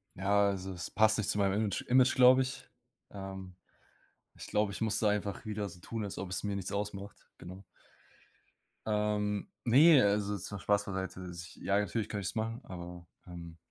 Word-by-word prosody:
Ja, 100 Hz, +2 st, +3 dB
also 95 Hz, -1 st, -4 dB
es 90 Hz, -1 st, -5 dB
passt 110 Hz, 0 st, +4 dB
nicht 110 Hz, -, -1 dB
zu -, -, 0 dB
meinem 100 Hz, -1 st, +2 dB
Image 105 Hz, -2 st, 0 dB
Image, 130 Hz, 0 st, +5 dB
glaube 130 Hz, 0 st, +7 dB
ich. 130 Hz, 0 st, -4 dB, 0.4 s
Ähm, 95 Hz, -2 st, -8 dB, 0.8 s
ich -, -, -9 dB
glaube, 105 Hz, -1 st, +1 dB
ich -, -, -6 dB
muss 110 Hz, -1 st, +1 dB
da 105 Hz, -, +3 dB
einfach 105 Hz, -1 st, -2 dB
wieder 105 Hz, -1 st, -3 dB
so 90 Hz, 0 st, -13 dB
tun, 110 Hz, +2 st, -4 dB
als 100 Hz, -, -6 dB
ob 95 Hz, -2 st, -5 dB
es 90 Hz, -, -2 dB
mir 100 Hz, -1 st, -1 dB
nichts 95 Hz, +1 st, -4 dB
ausmacht, 100 Hz, 0 st, -5 dB
genau. 95 Hz, +2 st, -10 dB, 1.2 s
Ähm, 105 Hz, -1 st, 0 dB, 0.2 s
ne, 140 Hz, +4 st, +7 dB
also 100 Hz, 0 st, +1 dB
jetzt 100 Hz, -1 st, -5 dB
mal 105 Hz, -, -5 dB
Spaß 105 Hz, +2 st, +1 dB
beiseite, 95 Hz, -1 st, -5 dB
ich 85 Hz, 0 st, -9 dB
ja, 100 Hz, 0 st, 0 dB
natürlich 105 Hz, +1 st, -1 dB
könnte 105 Hz, -2 st, -3 dB
ich -, -, -2 dB
es -, -, -5 dB
machen, 115 Hz, +1 st, -2 dB
aber, 90 Hz, -1 st, -9 dB, 0.2 s
ähm. 85 Hz, -2 st, -9 dB
100 Hz, 195 wpm, -32 LUFS, 95-105 Hz, 1.2 s, glaube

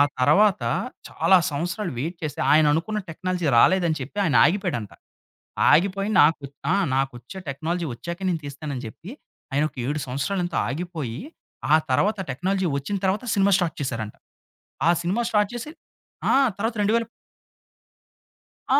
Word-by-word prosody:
ఆ -, -, +9 dB, 0.2 s
తర్వాత 195 Hz, +10 st, +4 dB, 0.5 s
చాలా 190 Hz, -, +4 dB
సంవత్సరాలు 170 Hz, +4 st, -3 dB
వెయిట్ 165 Hz, +6 st, -3 dB
చేసి, 155 Hz, -, -4 dB
ఆయననుకున్న 155 Hz, +8 st, +3 dB
టెక్నాలజీ 180 Hz, 0 st, -3 dB
రాలేదని 175 Hz, -2 st, +4 dB
చెప్పి, 135 Hz, +10 st, -8 dB
ఆయనాగిపోయాడంట. 150 Hz, -, +2 dB, 0.8 s
ఆగిపోయి 195 Hz, +5 st, +2 dB
నాకు 150 Hz, -1 st, +3 dB, 0.3 s
ఆ! -, -, +3 dB, 0.2 s
నాకొచ్చే 135 Hz, +4 st, -3 dB
టెక్నాలజీ 165 Hz, +5 st, -2 dB
వచ్చాకే 170 Hz, +8 st, -7 dB
నేను 165 Hz, -3 st, -1 dB
తీస్తానని 140 Hz, -2 st, -6 dB
చెప్పి, 170 Hz, -, -10 dB, 0.4 s
ఆయనొక 150 Hz, +3 st, 0 dB
7 150 Hz, +2 st, -1 dB
సంవత్సరాలెంతో 175 Hz, +8 st, -2 dB
ఆగిపోయి, 155 Hz, -6 st, -4 dB, 0.5 s
ఆ -, -, +8 dB
తర్వాత 205 Hz, +11 st, +2 dB
టెక్నాలజీ 185 Hz, +7 st, -1 dB
వచ్చిన 140 Hz, +9 st, -3 dB
తర్వాత 195 Hz, +5 st, 0 dB
సినిమా 200 Hz, 0 st, +3 dB
ష్టార్ట్ 175 Hz, -3 st, -1 dB
చేసారంట. 115 Hz, -6 st, -3 dB, 0.7 s
ఆ -, -, +7 dB
సినిమా 195 Hz, +8 st, 0 dB
షార్ట్ 210 Hz, -1 st, +2 dB
చేసి 240 Hz, +6 st, -6 dB, 0.6 s
ఆ! -, -, +4 dB, 0.3 s
తర్వాత 225 Hz, +3 st, -1 dB
రెండు 205 Hz, +2 st, +2 dB
వేలు 230 Hz, -1 st, +1 dB, 1.6 s
ఆ! -, -, +5 dB
170 Hz, 130 wpm, -24 LUFS, 145-195 Hz, 1.6 s, ఆ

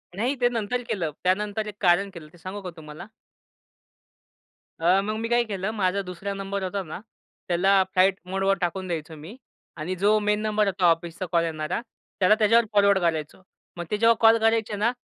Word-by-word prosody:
नाही 245 Hz, +7 st, 0 dB
ते 245 Hz, -, +4 dB
नंतर 240 Hz, +1 st, -2 dB
केलं. 170 Hz, -6 st, -1 dB
त्यानंतर 210 Hz, +3 st, 0 dB
एक 210 Hz, -, -7 dB
कारण 190 Hz, +2 st, +3 dB
केलं. 160 Hz, -3 st, -10 dB
ते -, -, -16 dB
सांगू 185 Hz, +4 st, -7 dB
का 185 Hz, -, -6 dB
तुम्हाला? 155 Hz, +3 st, -10 dB, 1.7 s
अ, 180 Hz, +4 st, +4 dB
मग 215 Hz, +2 st, -3 dB
मी 230 Hz, -, -2 dB
काय 240 Hz, 0 st, +3 dB
केलं 195 Hz, +1 st, -2 dB
माझा 200 Hz, -1 st, 0 dB
दुसरा 190 Hz, +2 st, -6 dB
नंबर 195 Hz, 0 st, -4 dB
होता 195 Hz, +1 st, -2 dB
ना. 160 Hz, +2 st, -8 dB, 0.5 s
त्याला 190 Hz, +2 st, +3 dB
फ्लाइटमोड 190 Hz, 0 st, +1 dB
वर 195 Hz, 0 st, +2 dB
टाकून 185 Hz, +2 st, -2 dB
द्यायचो 160 Hz, -2 st, -5 dB
मी 160 Hz, +10 st, -11 dB, 0.4 s
आणि 175 Hz, +5 st, -3 dB
जो 205 Hz, +4 st, +3 dB
मेन 210 Hz, 0 st, 0 dB
नंबर 215 Hz, -1 st, +1 dB
होता 185 Hz, -1 st, 0 dB
ऑफिसचा 165 Hz, +2 st, -3 dB
कॉल 170 Hz, -1 st, +3 dB
येणारा, 155 Hz, +5 st, -3 dB, 0.4 s
त्याला 200 Hz, +3 st, +5 dB
त्याच्यावर 230 Hz, +2 st, +4 dB
फॉरवर्ड 200 Hz, -1 st, +4 dB
करायचो. 160 Hz, 0 st, -2 dB, 0.4 s
मग 175 Hz, -, -4 dB
ते 210 Hz, -, +1 dB
जेव्हा 230 Hz, +1 st, +4 dB
कॉल 225 Hz, 0 st, +7 dB
करायचे 225 Hz, -1 st, +1 dB
ना, 215 Hz, +4 st, +1 dB
195 Hz, 185 wpm, -25 LUFS, 175-210 Hz, 1.7 s, कॉल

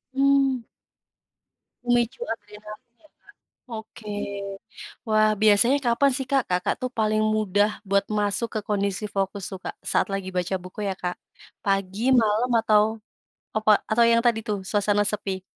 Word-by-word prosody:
Mmm. 275 Hz, -2 st, +3 dB, 1.2 s
Memicu 240 Hz, +1 st, +1 dB
adrenalin 215 Hz, +2 st, -9 dB
ya, 310 Hz, -, -23 dB
Kak? -, -, -45 dB, 0.5 s
Oke, 220 Hz, -1 st, -8 dB, 1.0 s
wah, 215 Hz, 0 st, +4 dB
biasanya 220 Hz, +6 st, +5 dB
kapan 275 Hz, +4 st, +3 dB
sih 265 Hz, -2 st, -4 dB
Kak, 270 Hz, -3 st, +3 dB
Kakak 180 Hz, 0 st, +1 dB
tuh, 255 Hz, -1 st, -2 dB
paling 215 Hz, 0 st, +2 dB
mudah 215 Hz, -1 st, +2 dB, 0.2 s
buat 200 Hz, 0 st, +3 dB
masuk 210 Hz, +2 st, 0 dB
ke -, -, -2 dB
kondisi 200 Hz, 0 st, -1 dB
fokus 195 Hz, 0 st, -1 dB
tuh, 190 Hz, -, -6 dB
Kak, -, -, -5 dB
saat -, -, +2 dB
lagi 195 Hz, -1 st, -3 dB
baca 180 Hz, +1 st, -1 dB
buku 185 Hz, +3 st, -9 dB
ya, 190 Hz, -, -1 dB
Kak, 180 Hz, 0 st, -3 dB, 0.5 s
pagi, 195 Hz, +5 st, 0 dB
malam, 220 Hz, +4 st, +1 dB
atau 210 Hz, -1 st, +4 dB, 0.7 s
apa, 215 Hz, 0 st, +3 dB, 0.2 s
atau 235 Hz, +2 st, +5 dB
yang 230 Hz, 0 st, +4 dB
tadi 230 Hz, -2 st, +3 dB
tuh, 205 Hz, -2 st, -1 dB
suasana 205 Hz, 0 st, +2 dB
sepi? 195 Hz, -2 st, -3 dB
215 Hz, 145 wpm, -24 LUFS, 200-235 Hz, 1.2 s, biasanya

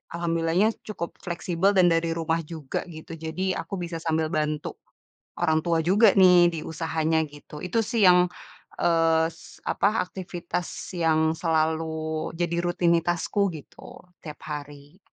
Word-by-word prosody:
alhamdulillahnya, 170 Hz, +4 st, +1 dB, 0.2 s
cukup 170 Hz, -6 st, -6 dB
fleksibel, 180 Hz, +2 st, 0 dB
dan 180 Hz, -2 st, +5 dB
dari 165 Hz, 0 st, +1 dB
rumah 165 Hz, 0 st, 0 dB
juga, 155 Hz, -5 st, -4 dB
gitu. 160 Hz, -1 st, -10 dB
Jadi, 170 Hz, +4 st, -2 dB
aku 200 Hz, -, -5 dB
bisa 170 Hz, -2 st, -5 dB
sambil 160 Hz, -1 st, 0 dB
bantu 150 Hz, -1 st, -2 dB, 0.6 s
orang 160 Hz, -2 st, +3 dB
tua 165 Hz, -1 st, +2 dB
juga 195 Hz, +6 st, +5 dB
nih, 180 Hz, -3 st, +6 dB
di 165 Hz, -, -4 dB
usahanya 160 Hz, 0 st, -1 dB
gitu, 150 Hz, 0 st, -12 dB
itu 180 Hz, +6 st, 0 dB
sih 225 Hz, -1 st, +1 dB
yang, 180 Hz, 0 st, +6 dB, 0.5 s
eee, 165 Hz, -1 st, +3 dB, 0.4 s
apa, 200 Hz, -, +2 dB, 0.2 s
aktivitas 180 Hz, -1 st, -5 dB, 0.3 s
yang 160 Hz, -2 st, +2 dB
selalu 160 Hz, -1 st, -1 dB
jadi 170 Hz, 0 st, 0 dB
rutinitasku, 175 Hz, +2 st, +1 dB
gitu, 155 Hz, +1 st, -12 dB, 0.2 s
tiap 150 Hz, -2 st, -8 dB
hari. 145 Hz, +3 st, -8 dB
165 Hz, 130 wpm, -25 LUFS, 160-175 Hz, 0.6 s, nih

